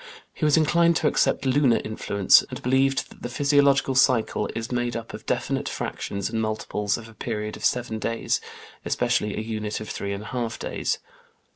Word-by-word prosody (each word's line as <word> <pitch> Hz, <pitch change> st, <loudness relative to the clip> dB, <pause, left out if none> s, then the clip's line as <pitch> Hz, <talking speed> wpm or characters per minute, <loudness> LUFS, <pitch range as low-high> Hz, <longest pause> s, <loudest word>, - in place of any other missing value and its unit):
He 155 Hz, -, -2 dB
was 150 Hz, +1 st, +4 dB
inclined 170 Hz, +2 st, +4 dB
to 160 Hz, -, +2 dB
accept 140 Hz, -, +1 dB
lunar 130 Hz, -2 st, +3 dB
influence, 100 Hz, -2 st, +4 dB
and -, -, -6 dB
believed 135 Hz, +2 st, +2 dB
that -, -, -16 dB
the 120 Hz, -, -4 dB
physiological 140 Hz, 0 st, +3 dB
cycle 130 Hz, -3 st, +2 dB
is 115 Hz, +2 st, -4 dB
made 120 Hz, -1 st, -1 dB
up 115 Hz, -1 st, -6 dB
of -, -, -9 dB
definite -, -, -1 dB
fractions 100 Hz, -1 st, -4 dB
and 110 Hz, 0 st, -2 dB
multiples 105 Hz, -1 st, -1 dB
of 115 Hz, -1 st, -10 dB
a 115 Hz, -, -14 dB
period 105 Hz, -2 st, -4 dB
of -, -, -11 dB
seven 120 Hz, -3 st, 0 dB
days, 115 Hz, +1 st, -1 dB, 0.4 s
especially 105 Hz, -1 st, 0 dB
a -, -, -1 dB
unit 110 Hz, -1 st, -3 dB
of 110 Hz, -, -7 dB
three 100 Hz, -, -4 dB
and 100 Hz, +1 st, -4 dB
a 110 Hz, -, -9 dB
half 120 Hz, -2 st, -2 dB
days. -, -, -2 dB
115 Hz, 185 wpm, -25 LUFS, 110-135 Hz, 0.4 s, was